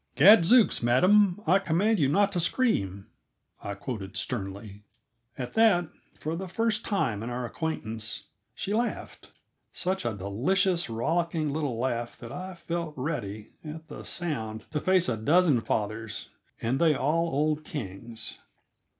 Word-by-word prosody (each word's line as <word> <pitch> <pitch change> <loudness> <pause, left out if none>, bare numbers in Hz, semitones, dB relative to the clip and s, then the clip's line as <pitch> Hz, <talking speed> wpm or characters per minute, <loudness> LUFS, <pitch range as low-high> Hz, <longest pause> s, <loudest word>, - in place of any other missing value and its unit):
"Gadzooks, 205 - +7
madam! 180 - +4
I 185 +4 +5
command 195 +4 +1
you 140 - +4
not 195 +8 +3
to 180 - -1
scream," 100 - 0 0.6
I 100 - -4
quoted 100 -3 -6
sternly. 100 -2 -4 0.6
At 125 -2 -5
that, 200 -7 +3 0.3
for 155 +2 -3
the 190 +3 -5
first 220 +3 0
time 125 - 0
in 115 - -4
our 125 0 -3
acquaintance, 115 -7 -3 0.3
she 200 - -3
laughed; 235 +2 -3 0.4
such 185 +1 -1
a 115 -3 -2
delicious, 170 - +1
rollicky 160 +7 0
little 145 -4 -2
laugh 120 -1 -2
that 115 -1 -9
I 185 0 -6
felt 170 -2 -4
ready, 115 -7 -4
at 160 +1 -8
the - - -8
sound, 110 -11 -3
to 150 - -1
face 185 +2 +3
a 115 - 0
dozen 150 +2 +4
fathers 110 0 -3 0.3
and 120 +4 0
they 160 -3 +5
all 155 +6 +1
old 150 +1 0
Kings. 115 -3 -7
150 Hz, 140 wpm, -28 LUFS, 115-180 Hz, 0.6 s, Gadzooks